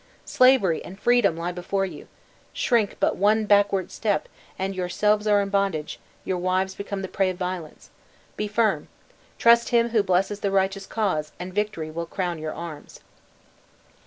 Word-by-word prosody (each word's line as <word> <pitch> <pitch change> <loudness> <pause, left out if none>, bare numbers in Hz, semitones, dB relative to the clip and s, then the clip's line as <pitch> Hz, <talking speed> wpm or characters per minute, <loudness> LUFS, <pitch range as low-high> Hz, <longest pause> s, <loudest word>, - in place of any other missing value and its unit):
Slavery 255 -10 +4
and 190 +2 -11
freedom 240 -9 +3
lie 170 +1 -3
before 195 +2 -2
you! 190 - -9 0.5
Shrink 230 -5 +1
but - - +1
one 215 +3 +3
backward 200 -2 +2
step, 210 -3 -1 0.3
and 190 +1 -2
yourselves 210 +4 0
are 205 -1 +4
in 200 - -3
bondage, 195 -6 -1 0.3
your 185 -1 -1
wives 185 +1 0
become 200 0 -5
the - - -3
prey 190 0 0
of 185 - -5
violence. 180 -4 -6 0.4
Be 210 - -2
firm 215 +1 +1 0.5
trust 235 0 +5
Him 235 -1 +3
who 225 -2 +3
blesses 195 +1 0
the 200 - -1
righteous 195 0 0
cause, 180 -9 -1
and 180 +1 -6
victory 205 -6 -2
will 170 +1 -5
crown 175 -2 -3
your 155 0 -5
arms!" 160 -3 -9
195 Hz, 160 wpm, -24 LUFS, 180-210 Hz, 0.5 s, trust